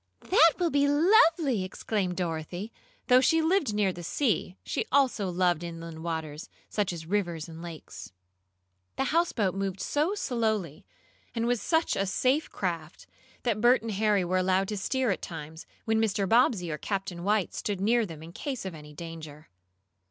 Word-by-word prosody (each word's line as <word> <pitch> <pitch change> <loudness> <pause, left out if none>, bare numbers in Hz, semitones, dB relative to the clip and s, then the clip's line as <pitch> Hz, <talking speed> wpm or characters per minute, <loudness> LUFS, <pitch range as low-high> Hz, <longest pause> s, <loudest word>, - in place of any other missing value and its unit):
"That 330 -4 +7
will 345 -3 +1
be 285 0 +3
lovely!" 315 - +4
exclaimed 185 -1 -2
Dorothy. 175 +4 -3 0.3
Though 255 0 +6
she 325 +5 +4
lived 325 - +2
near 205 -3 +1
the 175 - -8
sea, 190 - -1
she - - -2
also 255 -8 +2
loved 175 -2 +1
inland 165 -1 -7
waters, 160 -2 -4 0.2
such 205 -3 0
as 165 -2 -7
rivers 175 -4 -1
and 165 0 -10
lakes. 165 - -9 0.8
The - - 0
houseboat 245 - +2
moved 195 -1 -3
so 310 +8 0
slowly, 220 - -2 0.5
and 230 0 0
was 245 -1 +1
such 325 0 +1
a 195 - 0
safe 260 +10 +1
craft, 165 -4 -4 0.4
that 220 -4 0
Bert 240 0 +5
and 225 - -3
Harry 205 -2 +2
were 185 +1 +1
allowed 190 +1 +1
to 210 - -3
steer 255 +4 0
at - - -2
times, 160 -1 -8 0.2
when 220 0 +2
Mr. 200 -3 +1
Bobbsey 220 -6 +3
or 150 - -4
Captain 195 -2 -3
White 205 -1 +1
stood 205 -3 -3
near 230 +4 +3
them 165 -6 -7
in 165 - -10
case 260 +3 -5
of 190 - -4
any 150 -1 -11
danger. 160 -1 -9
195 Hz, 170 wpm, -28 LUFS, 170-245 Hz, 0.8 s, That